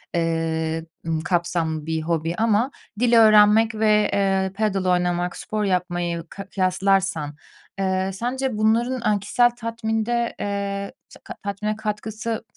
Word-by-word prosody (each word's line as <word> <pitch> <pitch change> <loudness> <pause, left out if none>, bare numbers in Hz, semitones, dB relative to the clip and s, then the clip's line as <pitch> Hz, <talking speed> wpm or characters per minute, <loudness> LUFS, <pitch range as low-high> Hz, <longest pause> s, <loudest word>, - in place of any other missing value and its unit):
ııı, 165 -1 -1 0.2
ımm, 160 -1 0
kapsamlı 170 -3 -1
bir 160 0 -1
hobi. 165 +1 -1
Ama 225 +4 +2 0.3
dil 240 0 +2
öğrenmek 215 +1 +6
ve, 215 -1 +3
eee, 195 -1 +1
padel 200 -3 0
oynamak, 180 0 +1
spor 215 0 -3
yapmayı 175 -3 -1
ka 195 0 -8
kıyaslarsan, 190 -5 0 0.4
eee, 190 0 0
sence 245 +3 -2
bunların, 230 +4 +1
aaa, 210 -2 +1
kişisel 240 +5 +3
tatminde, 230 0 -2
eee, 200 -1 -3 0.2
se - - -15
ta - - -7
tatmine 205 +2 -2
katkısı 220 +1 -4
200 Hz, 130 wpm, -23 LUFS, 175-220 Hz, 0.4 s, öğrenmek